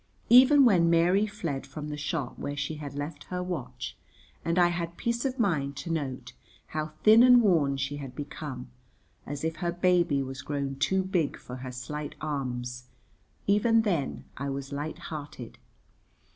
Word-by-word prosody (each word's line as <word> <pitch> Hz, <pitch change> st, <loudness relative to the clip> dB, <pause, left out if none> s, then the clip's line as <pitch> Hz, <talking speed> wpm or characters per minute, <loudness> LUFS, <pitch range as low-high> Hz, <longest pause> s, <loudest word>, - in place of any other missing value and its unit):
Even 265 Hz, +4 st, +8 dB
when 175 Hz, -7 st, +5 dB
Mary 175 Hz, +5 st, +4 dB
fled 165 Hz, -10 st, -4 dB
from 150 Hz, +2 st, -7 dB
the 150 Hz, -, -3 dB
shop 150 Hz, -3 st, -3 dB
where 145 Hz, 0 st, -4 dB
she 145 Hz, +2 st, -3 dB
had 145 Hz, -2 st, -7 dB
left 145 Hz, +1 st, -5 dB
her 180 Hz, 0 st, -3 dB
watch, 125 Hz, -8 st, -5 dB, 0.5 s
and 170 Hz, +1 st, 0 dB
I 175 Hz, -1 st, +5 dB
had 170 Hz, -1 st, -3 dB
peace 235 Hz, +2 st, -1 dB
of 265 Hz, -1 st, -1 dB
mind 150 Hz, -, 0 dB
to 170 Hz, -, -4 dB
note 140 Hz, -6 st, -3 dB, 0.4 s
how 155 Hz, 0 st, -2 dB, 0.2 s
thin 220 Hz, +2 st, +8 dB
and 250 Hz, 0 st, +8 dB
worn 160 Hz, -11 st, +3 dB
she 140 Hz, +2 st, -2 dB
had 135 Hz, -3 st, -8 dB
become, 140 Hz, -3 st, -6 dB, 0.6 s
as 145 Hz, +1 st, -5 dB
if 160 Hz, -1 st, -2 dB
her 175 Hz, +1 st, -1 dB
baby 175 Hz, -5 st, +2 dB
was 135 Hz, 0 st, -6 dB
grown 140 Hz, -1 st, -3 dB
too 190 Hz, +7 st, +1 dB
big 180 Hz, -5 st, 0 dB
for 125 Hz, -, -9 dB
her 130 Hz, 0 st, -6 dB
slight 145 Hz, +4 st, -6 dB
arms, 125 Hz, -4 st, -4 dB, 0.6 s
even 225 Hz, +3 st, +4 dB
then 170 Hz, -11 st, -1 dB
I 140 Hz, +1 st, -3 dB
was 135 Hz, 0 st, -5 dB
light 145 Hz, +2 st, -4 dB, 0.2 s
hearted. 145 Hz, -5 st, -8 dB
150 Hz, 170 wpm, -28 LUFS, 140-180 Hz, 0.6 s, Even